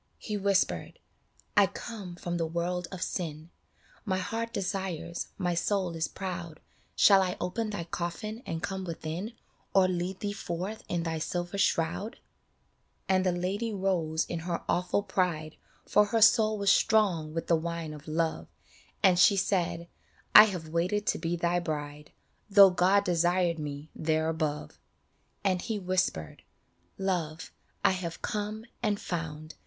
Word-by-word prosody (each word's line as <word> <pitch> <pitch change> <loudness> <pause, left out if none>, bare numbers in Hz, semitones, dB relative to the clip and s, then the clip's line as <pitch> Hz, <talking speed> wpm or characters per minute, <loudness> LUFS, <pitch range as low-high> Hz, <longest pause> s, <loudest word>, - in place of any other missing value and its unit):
He 210 - -5
whispered, 200 -1 0 0.3
" - - -44 0.2
I - - +6
come 200 -7 -7
from 175 0 -3
the 165 -1 0
world 175 +2 -2
of 185 -2 -3
sin; 160 -2 -4 0.5
My 190 -4 0
heart 225 +5 -3
desires, 185 -5 -3
my 180 -2 0
soul 180 0 0
is 160 0 -1
proud; 175 -4 -6 0.4
Shall 195 -2 +7
I 180 -1 -1
open 215 +5 -2
thy 205 -5 -3
coffin 175 +7 -4
and 165 0 -4
come 190 -1 -3
within, 170 +5 -5 0.4
Or 190 -1 +6
lead 180 +1 -2
thee 205 -1 -2
forth 190 +2 -5
in 175 -1 -1
thy 165 -1 -2
silver 175 +4 -3
shroud? 190 +6 0 0.5
" - - -43
And 185 -1 +3
the 185 - +2
Lady 190 +6 -2
rose 180 -5 0
in 170 - -4
her 170 +1 -3
awful 180 +3 +1
pride, 175 -5 -1 0.3
For 210 - +5
her 225 +2 0
soul 220 -1 +5
was 200 -1 +3
strong 185 -8 +3
with 165 - -2
the 170 - +3
wine 165 -1 -3
of 150 0 -11
Love, 160 +1 -1 0.6
And 185 -3 +5
she 195 +3 +6
said, 175 -3 0 0.2
" - - -32
I 210 - +12
have 180 -6 -4
waited 180 +6 0
to - - 0
be 170 0 -1
thy 175 +1 +1
bride, 150 -2 -5 0.4
Though 200 -1 +8
God 185 +3 +3
desired 175 -1 +2
me 145 0 -6
there 160 0 0
above." 155 - -3 0.6
And 185 -3 +1
he 225 -3 -2
whispered, 185 - -1 0.3
" 85 0 -40
Love, 170 -5 -2 0.3
I - - +6
have 180 -3 -4
come 215 +1 -3 0.2
and 210 -3 0
found 160 -2 -5
180 Hz, 160 wpm, -29 LUFS, 165-195 Hz, 0.6 s, I